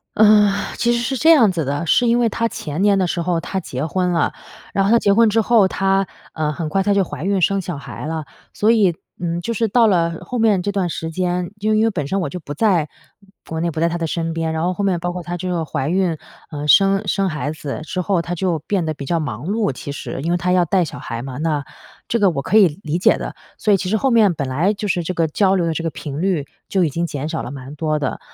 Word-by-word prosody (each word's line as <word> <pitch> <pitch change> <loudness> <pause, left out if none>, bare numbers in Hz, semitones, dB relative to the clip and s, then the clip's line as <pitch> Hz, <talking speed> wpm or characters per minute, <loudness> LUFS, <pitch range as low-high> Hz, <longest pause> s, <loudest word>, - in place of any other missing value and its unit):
呃， 210 -1 +6 0.3
其 240 - +2
实 235 - +1
是 265 +3 -1
这 320 +6 +5
样 235 -11 +6
子 165 -3 -1
的， 145 +5 -2
是 245 +9 +3
因 235 +1 +3
为 235 - +3
她 230 +1 0
前 155 +4 -5
年 200 -1 +4
的 185 - +1
时 170 - -2
候 170 -1 0
她 190 +3 -3
结 135 -2 -4
婚 180 +3 0
了。 165 -3 +1 0.4
然 195 - +2
后 200 - +2
她 235 - +6
结 200 - +3
婚 230 0 +5
之 225 +2 +2
后， 220 -3 +4
她， 195 0 +1 0.3
呃， 155 -1 -1
很 155 +1 -4
快 195 +5 0
她 205 0 +2
就 200 -1 +3
怀 155 - -7
孕 195 -1 +1
生 195 +3 +2
小 175 -4 -5
孩 140 - -8
了。 160 -1 -3 0.3
所 215 +2 +3
以， 200 -7 +4 0.3
嗯， 170 0 -1
就 230 +7 -3
是 225 -1 0
到 230 +1 +4
了 170 -4 +1
后 245 +7 -5
面 215 -5 +3
这 200 +3 -2
段 190 -3 0
时 160 0 -4
间， 180 +1 -1
就 215 +1 +1
因 215 +1 +3
为 - - +3
本 150 -10 -3
身 195 +4 -1
我 175 - -2
就 180 -2 -7
不 145 - -6
在 170 -3 +2 0.6
国 160 0 -3
内， 170 0 0
不 155 - -5
在 170 - +3
她 170 - -2
的 165 - -2
身 165 0 -2
边， 165 -1 -2
然 160 - -2
后 180 +1 +1
后 200 - -3
面 185 -3 +1
包 175 +1 -3
括 180 -1 -5
她 175 0 -4
这 185 +1 -4
个 170 -2 -1
怀 140 -2 -3
孕， 180 -2 +1 0.3
呃， 150 -1 -5
生 195 +4 +4
生 195 0 +1
孩 150 -1 -3
子 150 -2 -5
之 180 +3 -3
后， 180 -2 +1
她 175 +1 -4
就 175 -3 -1
变 185 +2 -1
得 155 - -1
比 140 -2 -8
较 170 - 0
忙 125 -1 -5
碌 210 -6 0
其 140 +2 -7
实， 135 - -6
因 170 - 0
为 175 - +2
她 180 +1 -1
要 180 -1 +3
带 185 +2 +2
小 155 - -6
孩 115 0 -5
嘛， 130 -1 -7
那 155 -2 -1 0.5
这 235 - +1
个 200 -2 +5
我 140 - -2
可 200 +9 +2
以 175 -8 +5
理 155 +1 -1
解 180 - +4
的。 - - -5 0.2
所 210 - +2
以 - - +5
其 185 - -4
实 220 - +1
后 260 +4 +1
面 215 -6 +5
本 140 -3 -3
来 170 +11 +1
就 210 0 -4
是 175 -1 0
这 185 - -3
个 165 -2 +1
交 190 +4 +2
流 175 -2 +1
的 165 - 0
这 165 - -3
个 165 - 0
频 145 +1 -6
率 180 -7 0 0.2
就 190 -2 +1
已 160 - +2
经 170 +5 -2
减 145 -1 -4
少 160 - -3
了 125 - -6
蛮 135 0 -8
多 155 0 -1
的。 145 - -3
175 Hz, 305 characters per minute, -20 LUFS, 160-200 Hz, 0.6 s, 呃